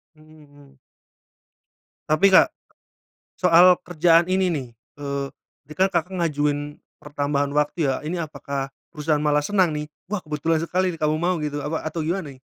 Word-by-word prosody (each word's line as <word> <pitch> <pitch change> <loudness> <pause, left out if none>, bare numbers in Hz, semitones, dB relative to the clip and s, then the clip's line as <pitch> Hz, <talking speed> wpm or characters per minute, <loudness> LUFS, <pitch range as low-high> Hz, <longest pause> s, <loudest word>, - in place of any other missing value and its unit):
Mhm 155 0 -19
mhm. 140 -1 -20 1.3
Tapi, 155 +6 +5
Kak - - +8 0.9
soal 180 0 +6
kerjaan 170 0 +3
ini 185 0 +2
nih. 140 -7 -3 0.3
Eee, 140 -1 -3 0.4
tadikan 185 +5 +1
Kakak 175 +2 -1
ngajuin 145 -3 -1 0.2
pertambahan 145 -1 -1
waktu 150 +1 0
ya? 135 - +1
Ini 165 +1 -2
apakah 140 -2 -5 0.2
perusahaan 150 -1 -1
malah 150 -1 +2
senang 185 -2 +2
nih, 150 0 -4 0.2
"Wah 210 0 -2
kebetulan 155 +2 0
sekali 185 +1 0
kamu 155 -1 0
mau," 180 +1 +1
gitu 150 -1 -3
apa 155 +2 -3
atau 160 +1 -3
gimana 165 -2 -3
nih? 130 - -20
155 Hz, 150 wpm, -23 LUFS, 145-175 Hz, 1.3 s, Kak